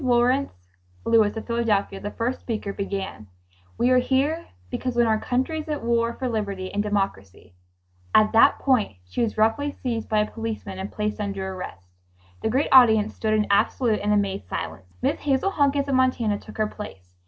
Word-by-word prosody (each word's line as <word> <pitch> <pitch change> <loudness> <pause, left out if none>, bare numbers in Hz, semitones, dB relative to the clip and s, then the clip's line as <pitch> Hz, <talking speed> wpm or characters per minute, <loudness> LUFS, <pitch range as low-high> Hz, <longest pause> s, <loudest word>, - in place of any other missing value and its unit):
Lawrence 240 - +1 0.3
Lewis 220 -1 +3
of 225 - -5
Philadelphia, 220 -4 0
the 205 - -4
first 240 +4 -2
speaker, 215 -4 -4
began: 195 - -5 0.5
"We 245 +2 +3
are 255 - +6
here 275 +6 0 0.2
because 255 -1 -3
when 240 0 +4
our 220 -1 +2
country 260 +8 -1
is 310 - -7
at 300 -1 -3
war 235 0 +1
for 260 - -3
liberty 200 -5 -3
and 205 - +1
democracy.. 195 - -3 0.3
." 90 0 -11
At 215 0 +6
that 230 +5 +6
point 250 - +1
she 90 - -3
was 230 -2 -1
roughly 225 +7 +2
seized 230 -3 -2
by 215 -1 +3
a 210 - -3
policeman 220 -4 -5
and 190 +2 -5
placed 210 0 -3
under 195 -2 -3
arrest. 180 - -8 0.6
The - - 0
great 265 +6 +1
audience 220 -5 +6
stood 215 -1 0
in 210 -1 +2
absolute 220 +2 +2
and 210 +1 0
amazed 200 - 0
silence. 90 0 -6
Miss - - +1
Hazel 285 +7 +1
Hunkins 285 -3 +1
of 275 - -1
Montana 250 -5 +2
took - - -12
her 215 - +2
place. 95 - -9
220 Hz, 190 wpm, -24 LUFS, 200-250 Hz, 0.6 s, are